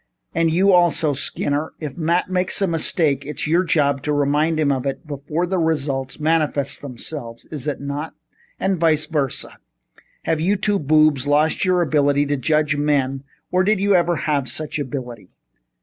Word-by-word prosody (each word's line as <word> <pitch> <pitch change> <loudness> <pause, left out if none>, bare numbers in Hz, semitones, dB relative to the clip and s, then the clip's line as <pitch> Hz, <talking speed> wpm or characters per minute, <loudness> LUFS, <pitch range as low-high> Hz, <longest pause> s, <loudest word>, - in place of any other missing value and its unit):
And 165 0 +2
you, 190 +4 +3
also, 170 -4 +3
Skinner? 145 +2 -2
If 150 -4 -6
Matt 170 +2 0
makes 185 0 +1
a 195 - +2
mistake, 160 -4 +1
it's 150 +1 -5
your 170 +4 +2
job 140 -5 +1
to 150 - -2
remind 150 +2 +1
him 145 -2 +2
of 135 0 -1
it 135 +5 -4
before 150 +3 -3
the 185 +1 -1
results 140 -4 -1
manifest 150 -3 0
themselves, 125 -2 -7
is 150 -3 -4
it 150 - -2
not? 140 +3 -5 0.4
And 190 -2 0
vice 155 -2 +2
versa. 145 -5 -3 0.6
Have 160 -1 0
you 190 +5 +2
two 205 0 +1
boobs 155 -2 +3
lost 150 +4 +2
your 180 -1 +3
ability 145 -2 +2
to 145 0 0
judge 150 +3 +1
men 140 -2 0 0.3
or 185 +1 +3
did 210 +1 +2
you 200 +1 +2
ever 175 -1 +3
have 150 -4 -1
such 155 0 -4
ability?" 125 -8 -6
150 Hz, 170 wpm, -21 LUFS, 140-165 Hz, 0.6 s, you